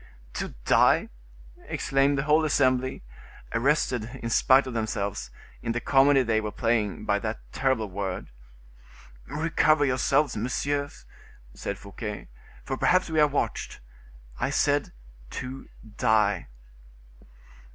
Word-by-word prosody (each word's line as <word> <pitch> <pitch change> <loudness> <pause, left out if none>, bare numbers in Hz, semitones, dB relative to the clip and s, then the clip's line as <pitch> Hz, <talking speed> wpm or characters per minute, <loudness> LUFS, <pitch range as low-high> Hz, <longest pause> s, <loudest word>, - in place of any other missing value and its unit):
"To - - -5
die!" - - +4 0.6
exclaimed 135 +1 +1
the 135 - 0
whole 155 +2 +3
assembly, 130 - +1 0.5
arrested, 125 -1 0
in 115 - -3
spite 135 +3 +5
of 130 - -6
themselves, 100 - -3 0.3
in 115 - -2
the 120 - -1
comedy 135 +2 +4
they 110 -2 +1
were 105 -1 -4
playing, 115 -3 -1
by 100 - +1
that 110 +1 -3
terrible 130 -4 0
word. 95 -6 -5 1.0
"Recover 155 0 +2
yourselves, 130 +1 +1
messieurs," 140 +5 -2 0.5
said 100 - -5
Fouquet, 100 - -7 0.3
"for 135 - -3
perhaps 185 +2 +2
we 160 - +1
are 150 - +6
watched—I - - -5
said: - - +1 0.4
to 130 - -7 0.3
die!" 105 -5 +2
125 Hz, 115 wpm, -26 LUFS, 105-140 Hz, 1.0 s, are